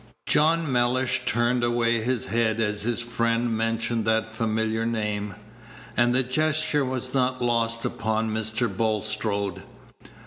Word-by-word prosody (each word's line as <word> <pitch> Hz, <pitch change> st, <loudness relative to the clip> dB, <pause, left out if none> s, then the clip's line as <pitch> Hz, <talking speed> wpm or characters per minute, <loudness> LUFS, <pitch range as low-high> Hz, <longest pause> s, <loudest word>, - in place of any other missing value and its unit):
John 160 Hz, 0 st, +3 dB
Mellish 125 Hz, +1 st, +1 dB
turned 120 Hz, +2 st, +1 dB
away 120 Hz, -1 st, +2 dB
his 125 Hz, +1 st, -1 dB
head 115 Hz, -1 st, 0 dB
as 105 Hz, -1 st, 0 dB
his 120 Hz, +2 st, -1 dB
friend 115 Hz, 0 st, 0 dB
mentioned 115 Hz, 0 st, -1 dB
that 110 Hz, 0 st, +1 dB
familiar 110 Hz, 0 st, -1 dB
name, 105 Hz, -3 st, -2 dB, 0.6 s
and 120 Hz, 0 st, +3 dB
the 130 Hz, -, +3 dB
gesture 155 Hz, +2 st, +1 dB
was 130 Hz, -1 st, -3 dB
not 130 Hz, -1 st, +1 dB
lost 115 Hz, -1 st, 0 dB
upon 110 Hz, +1 st, -1 dB
Mr. 110 Hz, +2 st, 0 dB
Bulstrode. 100 Hz, -2 st, -1 dB
115 Hz, 130 wpm, -25 LUFS, 110-125 Hz, 0.6 s, John